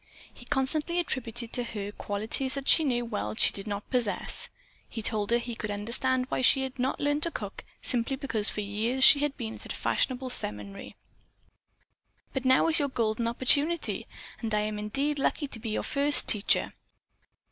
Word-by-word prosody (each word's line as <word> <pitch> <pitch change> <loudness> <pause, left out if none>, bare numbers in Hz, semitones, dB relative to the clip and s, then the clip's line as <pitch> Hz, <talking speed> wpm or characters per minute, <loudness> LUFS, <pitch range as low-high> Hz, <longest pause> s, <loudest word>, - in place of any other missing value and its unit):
He 245 - -13
constantly 295 +5 +2
attributed 240 -8 -3
to 245 - 0
her 205 -3 -5
qualities 220 +7 -3
that 275 -1 -5
she - - +7 0.2
well 220 - -3
knew 105 - -5
that - - -7
she - - +5
did 200 +1 -6
not 205 0 -4
possess. 245 -5 -2 0.4
He 225 - -6
told 210 -1 0
her 235 - +4
that 240 - -4
he 240 - -5
could 220 -1 -5
understand 240 +5 0
why - - -1
she 265 +1 +6
had 265 0 -6
not 260 +2 -1
learned 290 +1 0
to 335 - +3
cook 205 -10 -7 0.2
simply 245 +2 0
because 230 -6 0
for 210 - -3
years 220 +6 -1
she 285 - +10
had 290 -1 -1
been 225 -3 -5
away - - -10
at - - -6
a - - -6
fashionable 255 0 -1
seminary. 105 - -4 1.4
"But 265 -1 -3
now 260 +4 +4
is 330 0 +2
your 285 -1 0
golden 230 -2 -1
opportunity, 285 +8 +1 0.3
and 225 -2 -4
I 210 - +2
am 210 0 -3
indeed 275 +8 -2
lucky 290 +2 0
to 255 -5 -8
be 225 - -5
your 215 - -2
first 285 0 +3
teacher." 210 -1 +2
245 Hz, 195 wpm, -28 LUFS, 215-270 Hz, 1.4 s, she